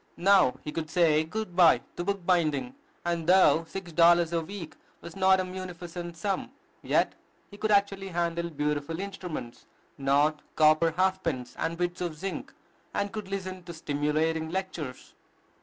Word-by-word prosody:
Now 190 -7 +5
he 150 - -5
could 155 0 -4
say 155 -2 +3
good 180 +2 -5
by 175 -3 +6 0.2
to 175 - -3
book 200 -1 -2
binding; 170 - +1 0.3
and, 170 -2 -1
though 180 -3 +5
six 190 -1 -7
dollars 170 0 +5
a 165 - +1
week 170 -1 -8 0.2
was 170 - -10
not 190 0 +4
a 185 - 0
munificent 175 -2 -7
sum, 195 +2 -2 0.3
yet - - +1 0.4
he 205 - -11
could 215 +1 -1
actually 200 -1 +2
handle 170 -1 -1
beautiful 150 +1 -2
instruments, 180 -10 -6 0.3
not 145 +3 +2
copper 155 +1 +5
half 190 0 +2
pence 130 -8 -3
and 165 +1 -2
bits 175 0 -2
of 170 -3 -3
zinc, 195 +4 -5 0.4
and 200 0 -1
could 215 -3 -6
listen 185 -1 -5
to 170 -2 -8
stimulating 155 +2 0
lectures. 170 -7 -5
170 Hz, 155 wpm, -28 LUFS, 160-190 Hz, 0.4 s, by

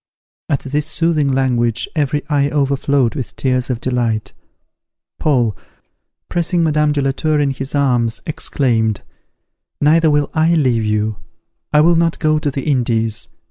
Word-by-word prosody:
At 140 - 0
this 145 +2 -2
soothing 160 -2 +1
language 125 -4 0
every 145 -1 0
eye 145 -2 +1
overflowed 140 -3 +1
with 120 -8 -6
tears 130 -1 0
of 125 -3 -2
delight. 120 -4 -1 0.9
Paul, 120 -8 +1 0.7
pressing 175 0 0
Madame 150 -1 +2
de 145 -1 0
la 135 - +1
Tour 155 +2 0
in 145 -1 +1
his 135 +1 -5
arms, 120 -5 +1
exclaimed, 115 -8 0 0.8
"Neither 160 +2 +4
will 145 -1 +1
I 160 +1 +3
leave 125 -7 +2
you! 105 0 -1 0.5
I 150 - +5
will 170 +2 +4
not 165 0 +1
go 155 -1 +1
to 150 - -1
the 135 -1 -4
Indies. 115 -6 0
140 Hz, 145 wpm, -17 LUFS, 120-150 Hz, 0.9 s, I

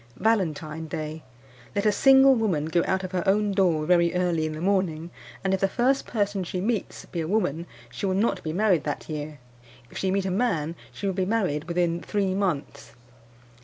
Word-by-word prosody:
"Valentine 160 -7 0
Day. 155 -1 -5 0.5
Let 200 +1 0
a 210 - +5
single 270 +4 +6
woman 200 - 0
go 170 +2 +1
out 190 0 0
of 185 - -5
her 185 -2 0
own 205 +1 +3
door 175 -6 +2
very 170 0 +3
early 175 -3 +1
in 155 - -4
the 155 - -6
morning, 175 -3 0 0.3
and 190 0 +1
if 190 - +1
the 195 - +2
first 255 +7 +1
person 205 -4 -1
she 180 +1 -4
meets 215 +2 -2
be 170 - -4
a 160 - -3
woman, 170 -4 0 0.2
she 200 - -3
will 185 - 0
not 195 -2 +1
be 155 - -4
married 185 -1 +2
that 145 - -4
year; 150 -1 -5 0.5
if - - -7
she 190 - 0
meet 195 0 0
a 190 - -1
man 180 -7 0 0.2
she - - -7
will 195 - 0
be 190 0 0
married 185 -8 0
within 170 -1 0
three 195 -2 -1
months. 150 - -3
185 Hz, 200 wpm, -25 LUFS, 160-200 Hz, 0.5 s, single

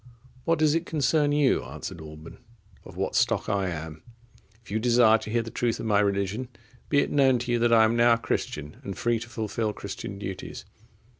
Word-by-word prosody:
—"What 165 0 +2
does 155 -1 +3
it 165 +1 -1
concern 150 -1 +2
you," 145 -2 +2
answered 85 - -8
Alban, 75 0 -11 0.5
"of - - -12
what - - -2
stock - - +1
I 100 -2 0
am? 80 -2 -6 0.6
If 110 - -14
you 110 - 0
desire 115 -1 +5
to 110 - -8
hear 115 +1 0
the 115 - -8
truth 120 -1 -1
of - - -5
my 105 -2 +3
religion, 100 +4 0 0.4
be 140 -1 +4
it - - -2
known 135 -3 +4
to 120 0 -3
you, 120 - +2
that 120 0 +2
I 115 -1 +6
am 110 +1 +2
now 120 0 +5
a - - +2
Christian, 75 -9 -4
and 95 -2 -6
free 120 -1 +1
to 120 +1 -9
fulfil 110 -1 -2
Christian 100 0 -7
duties." 95 -2 -7
115 Hz, 210 wpm, -26 LUFS, 100-125 Hz, 0.6 s, I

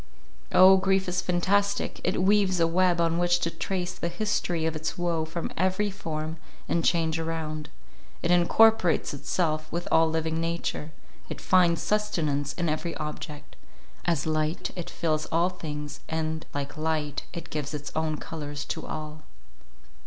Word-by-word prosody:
Oh! 190 +1 +8
grief 190 0 +2
is 180 0 0
fantastic; 200 +3 +1
it - - +1
weaves 195 -2 +3
a 165 - +5
web 175 +1 +3
on 165 0 +2
which 175 0 +3
to 170 - 0
trace 180 +2 -2
the - - -3
history 175 -3 -1
of 160 -1 0
its 155 +1 -3
woe 170 -2 0
from 165 +1 -4
every 190 +3 +1
form 160 -4 -4 0.3
and 170 - +1
change 165 -1 +2
around; 160 -2 -3 0.5
it 170 - +2
incorporates 180 +1 +4
itself 155 +1 -1
with 170 +1 -3
all 160 0 +5
living 160 0 -1
nature; 165 -2 -2 0.4
it - - -5
finds 175 -3 +3
sustenance 155 -9 0
in 175 -1 -2
every 155 +2 -2
object; 150 -1 -6 0.5
as 165 -5 +1
light, 155 +1 -1
it 175 -2 -5
fills 155 -2 -1
all 170 +2 +2
things, 150 -5 -6
and, 160 0 -2
like 145 +2 -4
light, 155 -2 -1
it 170 -1 -8
gives 150 -2 -3
its 150 -1 -5
own 155 -1 0
colours 145 -3 -6
to - - -4
all. 155 0 -6
165 Hz, 155 wpm, -27 LUFS, 155-180 Hz, 0.5 s, Oh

